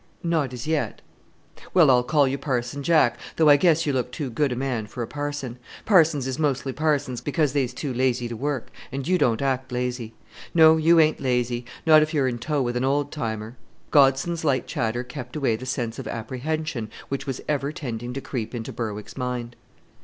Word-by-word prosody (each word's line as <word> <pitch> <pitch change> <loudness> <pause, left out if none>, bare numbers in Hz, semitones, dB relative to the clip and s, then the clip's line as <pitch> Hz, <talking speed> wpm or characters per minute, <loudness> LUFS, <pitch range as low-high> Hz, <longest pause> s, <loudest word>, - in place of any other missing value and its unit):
"Not 160 -6 0
as 125 -2 -6
yet." 155 -1 -1 0.8
"Well, 160 -7 +7
I'll 125 -1 +5
call 145 +2 +3
you 135 +1 -2
Parson 130 0 -2
Jack, 140 -6 +3 0.2
though 160 -2 +5
I 145 - +9
guess 165 +1 +3
you 145 - 0
look 125 -1 -1
too 135 0 -4
good 140 +3 +1
a - - -1
man 125 -4 -2
for 120 +3 -5
a - - -5
parson. 145 -4 -5 0.3
Parsons 160 - +4
is 130 +1 -3
mostly 135 -3 0
parsons 145 -4 0
because 145 -2 0
they're 140 -3 +2
too 130 +2 -5
lazy 125 -1 +1
to 120 - -5
work; 140 +1 -3 0.2
and 135 +1 -4
you 185 0 +2
don't 115 +2 +2
act 130 -1 -1
lazy. 125 -2 -3 0.4
No, 160 -1 +8
you 165 +1 +5
ain't 155 -1 +4
lazy; 125 -2 0 0.2
not 155 -1 +7
if 155 +1 -1
you 145 - +3
are - - +2
in 120 -2 -2
tow 145 +2 0
with 120 0 -2
an 125 - 0
old 140 +1 +1
timer." 110 -3 -4 0.3
Godson's 145 +4 +3
light 140 -4 +1
chatter 120 +2 -2
kept 125 0 -8
away 135 -7 +1
the 130 +4 -7
sense 120 -3 -3
of - - -6
apprehension 130 +1 -3 0.2
which 140 +1 -4
was 135 -2 -3
ever 145 -1 0
tending 120 -5 -5
to 135 - -4
creep 125 -3 -4
into 115 -1 -5
Berwick's 105 -3 -5
mind. 125 -2 -3
130 Hz, 205 wpm, -24 LUFS, 120-150 Hz, 0.8 s, I